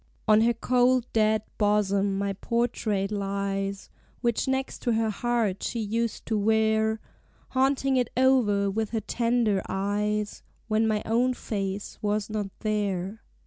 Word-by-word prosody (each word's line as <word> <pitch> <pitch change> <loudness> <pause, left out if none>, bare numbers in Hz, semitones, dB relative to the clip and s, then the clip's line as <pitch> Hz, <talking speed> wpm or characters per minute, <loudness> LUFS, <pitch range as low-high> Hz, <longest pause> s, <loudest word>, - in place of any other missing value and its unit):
"On 215 0 +6
her 235 +1 +3
cold 250 0 +2
dead 215 -1 +3 0.2
bosom 200 -2 +2
my 200 0 -1
portrait 215 -2 -1
lies, 195 -1 -2 0.3
Which 235 +1 0
next 265 0 -1
to 240 - 0
her 220 -1 +1
heart 225 -3 0
she 235 - -2
used 225 +1 -2
to 220 -2 0
wear 220 +1 +2 0.5
Haunting 265 0 +2
it 245 -2 +1
o'er 220 -7 +3
with 220 +1 -1
her 225 - 0
tender 230 -5 +1
eyes 210 +2 -1 0.3
When 220 0 +2
my 215 -1 0
own 245 +3 +2
face 195 -3 -4
was 210 0 -1
not 210 -2 -2
there. 205 -1 -2
215 Hz, 140 wpm, -27 LUFS, 200-235 Hz, 0.5 s, On